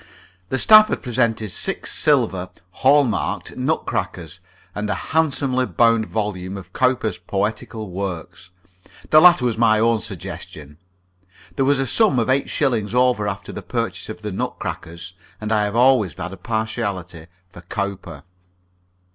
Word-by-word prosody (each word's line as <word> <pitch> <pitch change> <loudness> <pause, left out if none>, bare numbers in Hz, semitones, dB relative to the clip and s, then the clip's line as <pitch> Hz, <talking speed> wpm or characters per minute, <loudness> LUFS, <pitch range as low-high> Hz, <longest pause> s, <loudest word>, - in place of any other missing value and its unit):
The 130 - -1
staff 215 +7 +7
had - - -4
presented 115 -4 -1
six - - 0
silver 95 -1 +2 0.3
(hallmarked) 135 -3 +1
nutcrackers, - - -3 0.3
and 105 0 -4
a - - 0 0.2
handsomely 135 -5 +1
bound 115 -2 +2
volume 100 -3 -4
of 95 - -12
Cowper's 130 -4 0
Poetical 105 +1 -4
Works. 90 -2 -6 0.6
The 155 - +8
latter 175 -7 +6
was 115 -2 -1
my 110 -2 +4
own 115 0 +2
suggestion; 75 -7 -8 0.8
there 135 - +1
was 140 +1 +3
a 135 - 0
sum 215 - +3
of 120 +2 +1
eight 135 +1 0
shillings 120 -6 0
over 125 -4 +2
after 95 -2 -5
the - - -7
purchase 115 -7 -4
of 110 0 -8
the 105 - -4
nutcrackers, 90 -6 -5 0.3
and 110 0 -4
I 105 -1 +2
have 105 +1 -4
always 120 - +3
had 90 - -6
a - - -9
partiality 100 -7 -4 0.2
for 85 - -12
Cowper. 90 -4 -5
110 Hz, 145 wpm, -21 LUFS, 95-125 Hz, 0.8 s, The